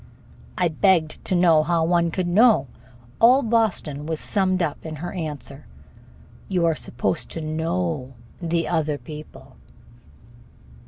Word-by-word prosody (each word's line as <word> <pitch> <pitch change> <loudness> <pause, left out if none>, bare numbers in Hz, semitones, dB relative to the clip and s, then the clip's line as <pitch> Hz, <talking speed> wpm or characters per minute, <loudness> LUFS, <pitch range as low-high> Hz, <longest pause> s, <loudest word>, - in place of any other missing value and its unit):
I 180 - +2
begged 165 -1 +1
to 185 - +1
know 170 -3 +5
how 165 0 +1
one 170 0 +2
could. 175 +1 -2
All 140 - +2
Boston 215 -11 0
was 160 -1 -2
summed 185 -3 0
up 150 -3 -3
in 160 -1 -6
her 170 +4 -6
answer: 150 -5 -6 0.8
"You 180 -3 +1
are 165 - +3
supposed 160 - -3
to - - -5
know 160 -3 -2 0.3
the 165 -1 -1
other 150 -2 0
people." 150 0 -11
165 Hz, 125 wpm, -23 LUFS, 155-180 Hz, 0.8 s, know